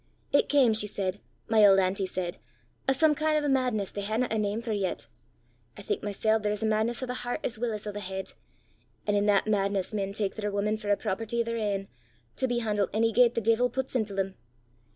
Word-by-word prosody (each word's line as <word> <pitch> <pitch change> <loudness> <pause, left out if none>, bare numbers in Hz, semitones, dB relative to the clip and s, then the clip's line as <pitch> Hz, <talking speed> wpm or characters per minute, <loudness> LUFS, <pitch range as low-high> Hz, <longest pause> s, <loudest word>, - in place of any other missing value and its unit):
It - - +3
cam, 265 -6 +5
she 215 -1 +2
said 195 -1 -3 0.3
my 220 -2 +5
auld 195 -1 +8
auntie 190 +1 +1
said 180 -1 -4 0.5
o' - - +6
some 300 +3 +4
kin' 305 0 +1
o' - - 0
madness 250 -7 +1
they 205 - -4
haena 220 +5 0
a 220 - +1
name 205 +1 -1
for 230 - -3
yet. 200 -3 -2 0.7
I - - -9
think 420 - -2
mysel' 220 +2 +1
there's 210 0 -2
a - - +2
madness 220 +3 0
o' - - 0
the 250 - -4
hert 245 -1 -3
as 220 - -3
weel 235 -1 -1
's 210 - -8
o' 210 - -3
the 205 - -6
heid; 190 -1 -5 0.7
an' 205 - +1
i' 205 - +3
that 205 -1 +4
madness 200 -2 0
men 195 -2 -1
tak 200 -1 -2
their 210 -1 -3
women 205 +2 0
for 210 -1 -6
a 205 - +4
property 225 +4 -2
o' - - +1
their 230 0 -3
ain, 200 -3 -1 0.5
to 260 - +1
be 240 -1 0
han'led 210 -3 0
ony 225 +1 +3
gait 240 +1 +4
the 230 - +1
deevil 230 +3 +3
pits 265 0 -3
intil 215 -5 -1
them. 195 0 -1
215 Hz, 235 wpm, -28 LUFS, 200-235 Hz, 0.7 s, auld